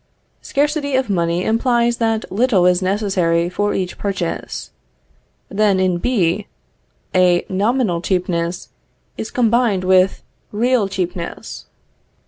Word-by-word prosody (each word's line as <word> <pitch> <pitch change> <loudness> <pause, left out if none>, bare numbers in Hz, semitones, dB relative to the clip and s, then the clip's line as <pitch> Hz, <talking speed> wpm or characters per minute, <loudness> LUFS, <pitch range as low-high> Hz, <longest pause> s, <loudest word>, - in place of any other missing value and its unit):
Scarcity 290 -1 0
of 260 -5 0
money 170 -1 0
implies 235 +1 +1
that 225 -1 -1
little 205 -3 +2
is 180 0 +3
necessary 185 -4 +1
for 205 +3 -1
each 185 -2 -3
purchase. 190 -4 -4 0.8
Then 200 -1 +2
in 185 -2 +1
B, 200 -4 0 0.7
a 180 -1 +3
nominal 200 -2 0
cheapness 175 -1 -2 0.5
is 220 - -5
combined 235 -5 +2
with 185 0 +3 0.3
real 235 0 +1
cheapness. 180 -2 -5
195 Hz, 110 wpm, -19 LUFS, 180-230 Hz, 0.8 s, is